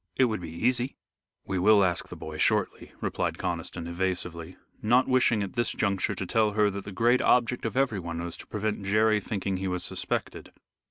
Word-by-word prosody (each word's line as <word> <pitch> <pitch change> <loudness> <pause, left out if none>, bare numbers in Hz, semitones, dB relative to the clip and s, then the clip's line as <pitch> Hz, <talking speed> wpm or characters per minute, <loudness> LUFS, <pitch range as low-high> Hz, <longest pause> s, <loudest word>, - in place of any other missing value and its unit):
It 130 - +4
would 110 -5 -2
be 85 - -6
easy." 120 +9 -1 0.5
"We 95 -2 -2
will 105 +2 +6
ask 90 -2 -1
the - - -7
boy 80 0 -8
shortly," - - +1
replied - - -2
Conniston, 85 0 -4
evasively, 90 -1 -3 0.2
not 125 +4 +3
wishing 120 -5 +3
at 95 - -6
this 120 -1 +1
juncture 100 0 0
to 95 - -4
tell 110 +1 +2
her 105 -1 +3
that 100 0 -6
the 100 - -6
great 120 +6 +3
object 125 0 +2
of 115 - -5
everyone 95 -11 -1
was 85 0 -3
to - - -11
prevent 105 -1 -3
Jerry 110 +2 +3
thinking 100 -2 -3
he 95 +1 -3
was 90 -1 -2
suspected. - - -3
100 Hz, 195 wpm, -27 LUFS, 90-110 Hz, 0.5 s, will